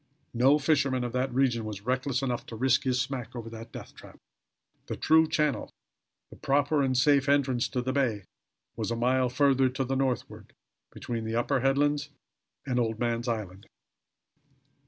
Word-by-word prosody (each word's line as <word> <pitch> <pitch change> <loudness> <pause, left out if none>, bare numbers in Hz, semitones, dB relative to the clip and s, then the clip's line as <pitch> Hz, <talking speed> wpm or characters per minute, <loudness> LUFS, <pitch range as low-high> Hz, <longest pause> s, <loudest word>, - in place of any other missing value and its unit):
No 130 +5 +4
fisherman 140 -4 +1
of 120 -1 -4
that 130 +1 -1
region 125 -3 +1
was 105 -1 -7
reckless 130 +2 -1
enough 125 -3 -2
to 115 - -8
risk 130 +3 +2
his 125 -1 +1
smack 130 -2 -4
over 115 -1 -7
that 115 0 -9
death - - -10
trap. - - -14 0.7
The - - -4
true 160 0 +4
channel, 150 -2 0 0.6
the - - -12
proper 145 +2 +1
and 130 -2 +1
safe 140 +1 +3
entrance 135 -4 +2
to 125 -2 -3
the 130 +1 -2
bay, 120 -8 0 0.5
was - - -3
a 115 - -1
mile 125 +2 +1
further 135 0 +3
to 130 +1 -2
the 135 +1 -2
northward, 130 -2 -3 0.4
between 115 -2 -5
the 110 0 -3
upper 130 +3 +1
headland 145 +2 +1 0.6
and 125 -2 0
Old 115 -2 -1
Man's 120 0 -1
Island. 105 -4 -4
130 Hz, 170 wpm, -28 LUFS, 120-140 Hz, 0.7 s, No